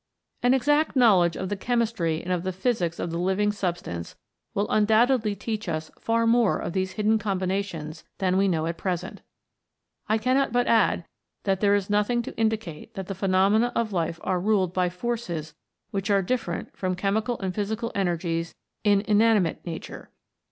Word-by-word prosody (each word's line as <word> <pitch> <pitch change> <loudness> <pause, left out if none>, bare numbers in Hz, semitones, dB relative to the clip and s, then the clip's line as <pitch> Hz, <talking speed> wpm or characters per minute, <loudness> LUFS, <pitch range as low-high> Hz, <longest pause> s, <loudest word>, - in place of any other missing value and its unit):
An 245 +2 +4
exact 295 +4 +2
knowledge 190 -10 +5
of 190 - -3
the 205 - -1
chemistry 215 -8 0
and 185 - -1
of 180 - -1
the 185 +1 -2
physics 185 -4 -1
of 170 - -3
the 170 - -2
living 190 +3 +1
substance 175 - -4 0.4
will 205 - +1
un 215 - +4
doubtedly 220 -1 +3
teach 215 -1 -4
us 155 -1 -3
far 230 0 +1
more 230 -2 +3
of - - -4
these 190 -1 -1
hidden 220 +1 +2
combinations 185 -5 -3
than 185 -2 +1
we 195 +1 +3
know 160 -4 0
at 165 0 -3
present. 185 0 -3 0.9
I 215 - +3
cannot 255 +4 +1
but 245 +1 +2
add 220 -6 +3 0.4
that 195 -2 +1
there 205 -1 +4
is 200 -2 -1
nothing 210 +4 +1
to - - -8
indicate 220 -8 -2
that 195 - -4
the 195 - -4
phenomena 195 +5 +2
of 225 -3 0
life 170 -1 -1
are 185 - 0
ruled 190 -3 +1
by 180 -1 +1
forces 180 -6 -4 0.4
which 195 +1 -2
are 200 -1 +3
different 180 -5 -3
from 185 -1 -2
chemical 210 +5 -1
and 190 -2 -2
physical 220 +3 -2
energies 170 -3 -1 0.3
in 205 -2 +4
inanimate 210 -4 +2
Nature. 165 -1 -7
195 Hz, 175 wpm, -26 LUFS, 180-220 Hz, 0.9 s, knowledge